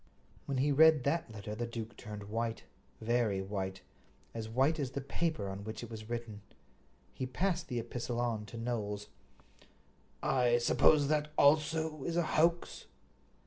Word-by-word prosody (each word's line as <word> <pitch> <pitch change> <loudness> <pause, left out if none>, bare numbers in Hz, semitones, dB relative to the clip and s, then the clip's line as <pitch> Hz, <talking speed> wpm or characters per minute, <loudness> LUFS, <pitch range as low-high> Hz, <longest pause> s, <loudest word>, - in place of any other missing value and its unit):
When 140 - -1
he 140 +3 +2
read 155 -1 +6
that 150 -2 0
letter 105 0 -6
the 120 +2 -3
duke 115 -1 -6
turned 105 -1 -8
white—very 115 -1 -2
white, 95 -1 -4 0.5
as 110 -1 -5
white 135 +7 +2
as 135 -3 -1
the 135 - -4
paper 155 -5 -2
on 95 +1 -5
which 110 +2 -6
it 120 - -8
was 110 0 -8
written. 115 -3 -5 0.7
He 130 - -3
passed 180 +8 -1
the 125 - -3
epistle 120 +1 -3
on 115 -3 -1
to 115 - -8
Knowles. 105 -3 -3 1.1
"I 120 -2 +3
suppose 145 +4 +4
that 150 0 +1
also 155 0 +3
is 170 0 -2
a 175 - +3
hoax?" 170 +2 +1
120 Hz, 150 wpm, -33 LUFS, 110-150 Hz, 1.1 s, read